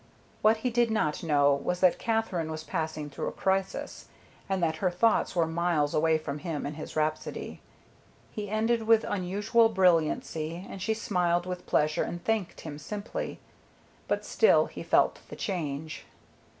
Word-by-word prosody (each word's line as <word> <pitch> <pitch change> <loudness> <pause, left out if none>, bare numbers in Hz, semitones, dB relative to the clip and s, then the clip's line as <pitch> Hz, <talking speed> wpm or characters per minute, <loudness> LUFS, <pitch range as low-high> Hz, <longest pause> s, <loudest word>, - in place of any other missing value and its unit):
What 215 +1 +5
he 250 - +2
did 240 0 +2
not 185 -9 0
know 145 -3 +4
was 180 0 -1
that 185 -2 +4
Katherine 220 -8 -1
was 155 0 -5
passing 155 -1 -3
through 145 - -5
a - - -2
crisis, 190 0 -2 0.4
and 190 -2 0
that 160 -1 +1
her 185 - +1
thoughts 195 +3 +2
were 170 -2 +3
miles 160 -3 0
away 160 +1 +3
from 150 -2 -5
him 160 -3 -4
and 145 +1 -4
his 155 - -8
rhapsody. 155 0 -2 0.7
He 205 -2 -5
ended 220 +1 0
with 225 -1 +5
unusual 205 +4 +2
brilliancy, 170 -2 +1
and 195 - -8
she 220 +3 0
smiled 175 -5 0
with 180 -1 -6
pleasure 150 0 +2
and 175 0 -4
thanked 220 -5 -1
him 150 -2 -7
simply, 205 +5 -5 0.7
but - - -1
still 450 - +4
he - - -9
felt - - +2
the - - -7
change. 155 -5 -4
175 Hz, 165 wpm, -28 LUFS, 155-210 Hz, 0.7 s, What